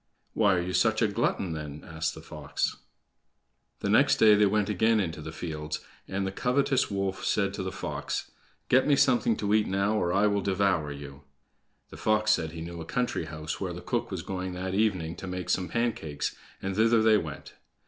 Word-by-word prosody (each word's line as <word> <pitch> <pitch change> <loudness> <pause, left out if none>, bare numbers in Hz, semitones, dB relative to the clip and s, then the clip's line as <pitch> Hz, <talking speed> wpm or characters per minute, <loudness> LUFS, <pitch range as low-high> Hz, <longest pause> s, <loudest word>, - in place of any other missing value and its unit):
"Why 100 -3 +4
are 90 - +1
you 90 +1 -4
such 110 +2 +3
a - - +4
glutton, 100 -3 0
then?" 75 -1 -6
asked 80 -1 -2
the - - -11
fox. - - -3 1.0
The - - -1
next - - +5
day 110 -1 +6
they 105 0 +5
went 105 0 +1
again 110 +2 +3
into 80 -6 -2
the 80 +1 -6
fields, 80 -1 -4 0.3
and 95 +1 -2
the 95 - -2
covetous 130 +5 +1
wolf 95 -1 -2
said - - +1
to - - -4
the - - -3
fox: - - -4 0.4
"Get 130 +2 +4
me 145 - +5
something 120 -4 +3
to 105 0 0
eat 110 -1 +3
now, 100 +3 +1
or 85 - 0
I 100 +3 +3
will 100 -1 +2
devour 95 -6 +1
you!" 70 0 -9 0.7
The - - -10
fox 110 0 +2
said 80 -7 +1
he 85 - -6
knew 85 0 -6
a - - -4
country 125 -4 -1
house 80 -1 -5
where - - -2
the - - -7
cook - - -2
was - - -4
going 95 -1 -4
that 95 +1 -4
evening 95 -6 +1
to 95 - -7
make 90 -1 -3
some 90 -1 0
pancakes, 115 -11 -2 0.3
and 95 0 -2
thither 115 +1 +4
they 110 -1 +6
went. 75 -5 -7
95 Hz, 205 wpm, -28 LUFS, 80-110 Hz, 1.0 s, day